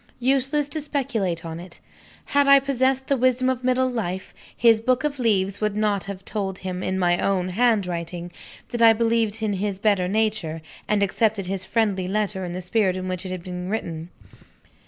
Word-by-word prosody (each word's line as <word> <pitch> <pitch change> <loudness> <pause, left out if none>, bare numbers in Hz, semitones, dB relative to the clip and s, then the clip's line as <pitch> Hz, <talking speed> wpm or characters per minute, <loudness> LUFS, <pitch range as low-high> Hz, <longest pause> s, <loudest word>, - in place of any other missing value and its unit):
Useless 270 +3 +1
to 310 +2 -3
speculate 230 - -2
on 165 0 -5
it! 175 0 -11 0.5
Had 285 0 +2
I 275 0 +8
possessed 265 -1 +1
the 275 - +1
wisdom 255 0 +2
of 255 -1 -4
middle 255 0 +2
life, 190 -7 -4 0.2
his 230 -2 +5
book 255 +3 +1
of 290 -2 -2
leaves 200 -4 +1
would 210 -1 0
not 210 -2 0
have 195 -1 -7
told 195 -3 -3
him, 185 -1 -5
in 185 0 -1
my 175 -1 +2
own 185 -2 0
handwriting, 180 -5 0 0.4
that 240 - -3
I 225 -1 +8
believed 225 -1 0
in 210 -2 0
his 200 0 -2
better 200 -3 +2
nature, 195 -6 -1 0.2
and 210 -1 +2
accepted 205 0 +1
his 185 0 -3
friendly 205 -5 0
letter 200 -1 -1
in 175 -1 -4
the 180 - -4
spirit 185 0 +1
in 185 0 -4
which 185 -1 -3
he 190 - -6
had 185 -2 -6
written. 180 -2 -4
205 Hz, 185 wpm, -24 LUFS, 185-240 Hz, 0.5 s, I